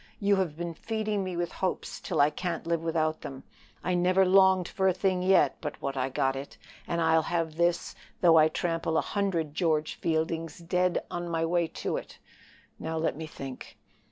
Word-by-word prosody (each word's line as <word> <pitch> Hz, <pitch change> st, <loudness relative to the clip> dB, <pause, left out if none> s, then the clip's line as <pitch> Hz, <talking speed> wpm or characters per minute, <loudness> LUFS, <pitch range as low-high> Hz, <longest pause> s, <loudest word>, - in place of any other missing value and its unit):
You 200 Hz, -1 st, +3 dB
have 170 Hz, -5 st, -1 dB
been 170 Hz, 0 st, -4 dB
feeding 215 Hz, +1 st, -2 dB
me 185 Hz, -2 st, -4 dB
with 175 Hz, 0 st, -1 dB
hopes 185 Hz, -, -3 dB
till -, -, -3 dB
I 145 Hz, +1 st, +4 dB
can't 175 Hz, -1 st, -3 dB
live 170 Hz, -1 st, 0 dB
without 160 Hz, -1 st, 0 dB
them. 135 Hz, -1 st, -8 dB, 0.4 s
I 180 Hz, -, 0 dB
never 180 Hz, +2 st, +3 dB
longed 190 Hz, -1 st, +5 dB
for 190 Hz, -1 st, 0 dB
a 185 Hz, -, +3 dB
thing 185 Hz, -1 st, +1 dB
yet 185 Hz, -6 st, +4 dB
but 150 Hz, -, -5 dB
what 140 Hz, 0 st, -3 dB
I 130 Hz, 0 st, -1 dB
got 135 Hz, 0 st, 0 dB
it, 135 Hz, +1 st, -7 dB, 0.3 s
and 170 Hz, -, -1 dB
I'll 160 Hz, -1 st, +4 dB
have 165 Hz, -1 st, -2 dB
this 175 Hz, +1 st, +1 dB, 0.3 s
though 170 Hz, -2 st, +6 dB
I 155 Hz, -, +6 dB
trample 165 Hz, 0 st, -1 dB
a -, -, +4 dB
hundred 175 Hz, -7 st, -1 dB
George 155 Hz, -3 st, 0 dB
Fieldings 165 Hz, 0 st, -1 dB
dead 180 Hz, +1 st, 0 dB
on 175 Hz, 0 st, -4 dB
my 165 Hz, -1 st, 0 dB
way 170 Hz, 0 st, +1 dB, 0.2 s
to -, -, 0 dB
it. -, -, -8 dB, 0.6 s
Now 160 Hz, 0 st, -3 dB
let 160 Hz, -2 st, 0 dB
me 160 Hz, +1 st, -6 dB
think." 135 Hz, -4 st, -9 dB
170 Hz, 195 wpm, -28 LUFS, 160-180 Hz, 0.6 s, though